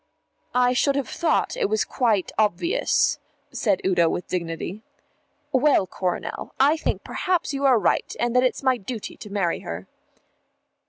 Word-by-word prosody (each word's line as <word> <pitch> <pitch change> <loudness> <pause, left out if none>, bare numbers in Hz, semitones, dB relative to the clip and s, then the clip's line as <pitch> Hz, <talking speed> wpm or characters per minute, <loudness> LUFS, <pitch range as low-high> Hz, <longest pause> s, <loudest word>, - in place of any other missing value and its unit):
"I 250 0 +4
should 275 +2 +2
have 280 -2 -1
thought 340 +7 0
it 470 -5 0
was 435 0 +2
quite 220 -8 0
obvious," 215 - +1 0.3
said 205 -5 0
Udo 175 -3 +3
with 175 - -3
dignity. 170 +3 -4 0.7
"Well, 270 -6 +4
Coronel, 180 -1 -4
I 285 +4 +5
think 320 - -2
perhaps 360 -6 -1
you 275 0 -1
are 260 -3 +6
right 215 - +1
and 240 0 0
that 250 - +6
it's 255 +2 0
my 260 -1 +3
duty 225 0 -6
to 210 - -10
marry 195 -4 0
her." 85 +3 -7
245 Hz, 155 wpm, -24 LUFS, 190-280 Hz, 0.7 s, are